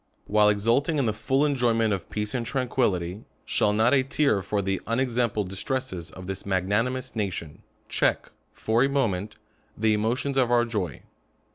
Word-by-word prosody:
While 105 0 +4
exulting 115 +9 +2
in 140 - +1
the 110 - +1
fuJI 135 +6 +1
enjoyment 120 -6 +2
of 95 -3 -5
peace 105 0 -3
and 125 - -1
tran 125 +1 -2
fuillity, 95 -6 0 0.2
shall 105 - +2
not 110 +4 +3
a 135 - +5
tear 135 -5 +1
for 105 +2 -2
the 95 0 -1
unexampled 115 -4 0
distresses 95 -3 -4
of 90 +3 -10
this 95 +1 -5
magnanimous 115 +8 -1
nation, 95 -8 -4 0.3
check, - - 0 0.2
for 115 +3 +1
a 135 - +2
moment, 105 -8 -1 0.4
the 110 0 +2
emotions 120 +6 0
of 125 -3 +3
our 120 -1 +4
joy 105 -6 -4
110 Hz, 165 wpm, -26 LUFS, 100-130 Hz, 0.4 s, a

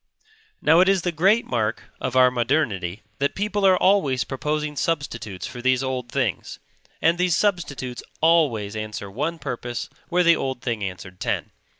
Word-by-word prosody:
Now 160 +3 +6
it 185 +1 +5
is 195 -3 +2
the 175 - 0
great 195 +8 +3
mark 110 -2 -1 0.2
of 130 0 -3
our 130 -1 +6
modernity 115 - -1 0.2
that 140 +1 0
people 205 0 +1
are 185 -1 +5
always 150 - +3
proposing 150 +5 -3
substitutes 140 - -3
for 120 - -7
these 130 +1 +2
old 130 -2 -3
things; - - -2 0.5
and 170 +2 +3
these 180 -2 +2
substitutes 145 -11 -1 0.2
always 140 -11 +2
answer 105 -2 -5
one 150 +10 -2
purpose 120 -5 -5 0.2
where 180 0 +3
the 170 -1 +6
old 130 -2 -3
thing 115 -4 -2
answered 95 -1 -7
ten. - - -2
135 Hz, 165 wpm, -23 LUFS, 115-170 Hz, 0.5 s, Now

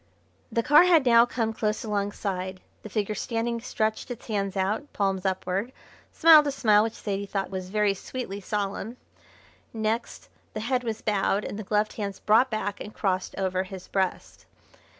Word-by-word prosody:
The 230 +1 0
car 300 +7 +7
had 330 -6 +5
now 235 -1 +6
come 225 -3 -1
close 215 -1 -1
alongside. 200 -3 -3 0.2
The 215 - -9 0.2
standing 230 +2 -2
figure - - -14
stretched 220 -1 -2
its 245 -1 -7
hands 200 -3 -2
out, 210 +10 -1
palms 195 -1 0
upward, 190 +4 -2 0.4
smiled 310 -2 +7
a - - +1
smile 215 -6 +4
which 225 +1 -1
Zaidie 200 -1 -4
thought 195 -1 -2
was 185 -1 -5
very 210 0 +2
sweetly 200 -1 -6
solemn, 205 +3 -3 0.8
next 220 +1 -3 0.3
the 215 - -3
head 250 +2 0
was 225 -2 -4
bowed, 205 -1 +1
and 205 - -5
the - - -4
gloved 210 +2 0
hands 200 -3 -4
brought 225 +5 +4
back 205 -3 -3
and 210 - -8
crossed 185 -3 -1
over 185 -1 0
his 190 -1 -8
breast. 190 -2 -3
210 Hz, 170 wpm, -26 LUFS, 195-230 Hz, 0.8 s, car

